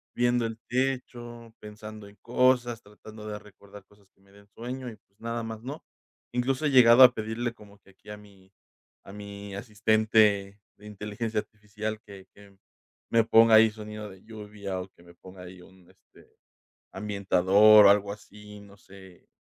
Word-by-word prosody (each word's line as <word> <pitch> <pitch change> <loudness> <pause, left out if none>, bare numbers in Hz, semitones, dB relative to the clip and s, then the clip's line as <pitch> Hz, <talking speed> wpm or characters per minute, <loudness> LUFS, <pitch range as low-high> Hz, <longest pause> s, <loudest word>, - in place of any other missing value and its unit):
viendo 120 -1 +1
el 115 0 -9
techo 120 -3 -4
pensando 105 0 -11
en 100 - -21
cosas, 120 -1 +1
tratando 105 +1 -14
de 105 -1 -6
recordar 100 -1 -16
cosas 100 -1 -26
que - - -38
me 100 0 -26
den 100 0 -20
sueño. 125 +3 -7
Y, 110 - -12
pues, 100 - -43
nada 115 0 -4
más, 110 0 -8
no, 140 +5 -7 0.5
incluso, 130 +4 -1
he - - +2
llegado 125 -1 +7
a 125 -1 +8
pedirle 110 +2 -4
como 105 -3 -18
que 100 - -23
aquí 95 - -20
a 105 - -8
mi 100 -2 -20 0.5
a 95 - -12
mi 100 -1 -9
asistente 105 -2 +1 0.2
de 105 - -18
inteligencia 105 +2 -4
artificial 105 +1 -7
que 100 -2 -13
que 100 -1 -19 0.5
me 115 -1 +4
ponga 115 0 +5
ahí 110 0 +6
sonido 105 -1 -9
de 95 -1 -16
lluvia, 105 -3 -7
o 90 - -10
que 85 - -24
me 85 0 -18
ponga 95 +1 -14
ahí 90 0 -12
un, 95 -1 -20
este, - - -23 0.7
ambientador 100 +1 +4
o - - +7
algo 100 0 0
así. 105 0 -14
No 100 0 -17
sé, 95 -2 -17
105 Hz, 175 wpm, -26 LUFS, 100-115 Hz, 0.7 s, a